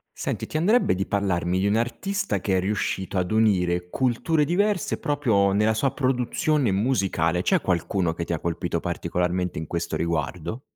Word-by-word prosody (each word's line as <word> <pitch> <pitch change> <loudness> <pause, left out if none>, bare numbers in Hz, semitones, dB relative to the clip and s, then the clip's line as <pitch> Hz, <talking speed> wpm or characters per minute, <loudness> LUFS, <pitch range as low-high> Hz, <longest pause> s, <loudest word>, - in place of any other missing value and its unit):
Senti, - - -3
ti 155 - -2
andrebbe 210 - +3
di 95 +2 -2
parlarmi 95 -3 0
di 95 - +1
un 100 +2 +2
artista 195 - -1
che 95 -2 +1
è - - +2
riuscito 95 -1 -2
ad 90 -1 0
unire 90 -5 +2
culture 130 - +1
diverse, 195 +4 0
proprio 120 -11 +2
nella 105 +2 +3
sua 125 +5 0
produzione 130 +1 +1
musicale, 95 -6 +1
c'è 175 - +2
qualcuno 90 -1 0
che 85 +1 -4
ti 85 - -2
ha - - -2
colpito 85 +1 -2
particolarmente 90 0 -2
in 80 - -4
questo 85 +1 -3
riguardo? 85 - -2
100 Hz, 165 wpm, -24 LUFS, 90-130 Hz, -, andrebbe